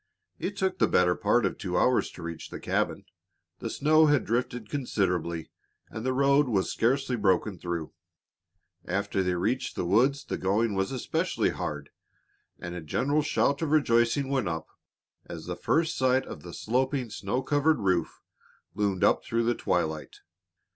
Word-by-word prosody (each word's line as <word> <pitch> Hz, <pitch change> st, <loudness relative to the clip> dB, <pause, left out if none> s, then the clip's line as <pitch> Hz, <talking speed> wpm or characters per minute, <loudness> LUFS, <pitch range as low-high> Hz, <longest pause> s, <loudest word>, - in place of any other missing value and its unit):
It 200 Hz, +1 st, -4 dB
took 190 Hz, -1 st, -1 dB
the -, -, +4 dB
better 90 Hz, -1 st, +3 dB
part 105 Hz, +4 st, +2 dB
of 95 Hz, -, -2 dB
two 90 Hz, -2 st, -2 dB
hours 125 Hz, -1 st, +3 dB
to 90 Hz, -, -10 dB
reach 85 Hz, -1 st, -6 dB
the -, -, -7 dB
cabin. -, -, -1 dB, 0.5 s
The -, -, -4 dB
snow 155 Hz, +2 st, +4 dB
had 145 Hz, -2 st, +3 dB
drifted 120 Hz, -1 st, -2 dB
considerably, 90 Hz, -, -1 dB, 0.4 s
and 110 Hz, -, -6 dB
the 130 Hz, -, 0 dB
road 140 Hz, +2 st, +3 dB
was 100 Hz, -6 st, 0 dB
scarcely 130 Hz, +2 st, +1 dB
broken 100 Hz, -2 st, +1 dB
through. 85 Hz, -2 st, -4 dB, 0.9 s
After 95 Hz, -, -1 dB
they 90 Hz, -1 st, 0 dB
reached 120 Hz, +8 st, -1 dB
the -, -, -2 dB
woods 130 Hz, +9 st, +2 dB
the -, -, -4 dB
going 105 Hz, +4 st, +1 dB
was 95 Hz, +3 st, -1 dB
especially 130 Hz, -2 st, 0 dB
hard, 75 Hz, -1 st, -5 dB, 0.7 s
and 85 Hz, 0 st, -7 dB
a 90 Hz, -, -5 dB
general 140 Hz, -, 0 dB
shout 140 Hz, -1 st, +1 dB
of 160 Hz, -, 0 dB
rejoicing 130 Hz, -2 st, +2 dB
went 135 Hz, -7 st, 0 dB
up 80 Hz, -2 st, -4 dB, 0.6 s
as -, -, -8 dB
the -, -, -4 dB
first 165 Hz, 0 st, +1 dB
sight 130 Hz, 0 st, +2 dB
of -, -, -8 dB
the 85 Hz, -1 st, -9 dB
sloping, 130 Hz, +1 st, -1 dB
snow 105 Hz, +6 st, -2 dB
covered 145 Hz, +3 st, +2 dB
roof 90 Hz, -4 st, 0 dB, 0.5 s
loomed 100 Hz, -1 st, 0 dB
up -, -, +4 dB
through 115 Hz, 0 st, 0 dB
the 120 Hz, +1 st, +2 dB
twilight. 80 Hz, -8 st, -2 dB
115 Hz, 165 wpm, -28 LUFS, 90-135 Hz, 0.9 s, the